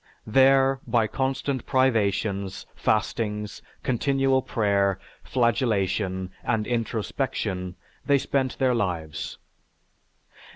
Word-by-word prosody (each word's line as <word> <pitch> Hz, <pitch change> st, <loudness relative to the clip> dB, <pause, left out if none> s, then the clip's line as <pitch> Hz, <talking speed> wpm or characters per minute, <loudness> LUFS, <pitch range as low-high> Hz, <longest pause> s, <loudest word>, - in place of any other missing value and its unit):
There, 135 Hz, +3 st, +4 dB
by 115 Hz, -2 st, +3 dB
constant 135 Hz, +2 st, -2 dB
privations, 105 Hz, -6 st, +1 dB
fastings, 105 Hz, -1 st, -1 dB, 0.2 s
continual 135 Hz, +1 st, +2 dB
prayer, 100 Hz, -5 st, +1 dB, 0.3 s
flagellation, 100 Hz, -6 st, 0 dB
and 110 Hz, -1 st, 0 dB
introspection, 110 Hz, -5 st, -2 dB, 0.3 s
they 140 Hz, -1 st, +4 dB
spent 135 Hz, -1 st, -1 dB
their 130 Hz, -2 st, +2 dB
lives. 85 Hz, -9 st, -3 dB
115 Hz, 80 wpm, -25 LUFS, 100-130 Hz, 0.3 s, There